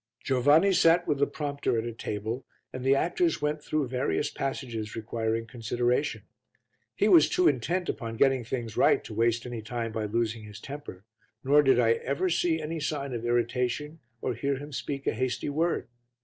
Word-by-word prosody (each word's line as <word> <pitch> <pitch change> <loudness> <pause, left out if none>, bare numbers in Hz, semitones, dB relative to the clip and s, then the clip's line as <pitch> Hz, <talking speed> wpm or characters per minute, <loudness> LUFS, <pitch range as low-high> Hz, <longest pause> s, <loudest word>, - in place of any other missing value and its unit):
Giovanni 145 +9 +4
sat 170 0 +4
with 145 -2 0
the 140 - +3
prompter 140 -5 -2
at 110 - -1
a 120 - -4
table 110 +3 -4 0.3
and 130 - -5
the 135 +1 +4
actors 165 +2 +1
went 150 0 -2
through 155 -3 -1
various 130 +3 -1
passages 120 -5 -4
requiring 115 0 -2
consideration. 120 +4 -1 0.7
He - - +2
was 340 -3 +7
too 360 0 +3
intent 180 - 0
upon 115 -2 -4
getting 135 -1 +3
things 115 -2 -4
right - - +4
to - - -8
waste 115 +1 +1
any 120 -2 -5
time 115 +1 -4
by 110 -1 -2
losing 115 +1 -1
his 105 0 -10
temper, 140 -8 -8 0.4
nor 145 +2 +5
did 135 -3 +4
I 115 -2 +4
ever 140 +10 0
see 165 -1 +1
any 160 +1 -4
sign 140 -3 -3
of 120 -1 -4
irritation 125 +6 -1 0.2
or 125 - -1
hear 140 +4 -1
him 145 +2 -8
speak 140 0 -4
a - - +1
hasty 130 +4 -2
word. 165 +4 0
130 Hz, 180 wpm, -28 LUFS, 115-150 Hz, 0.7 s, was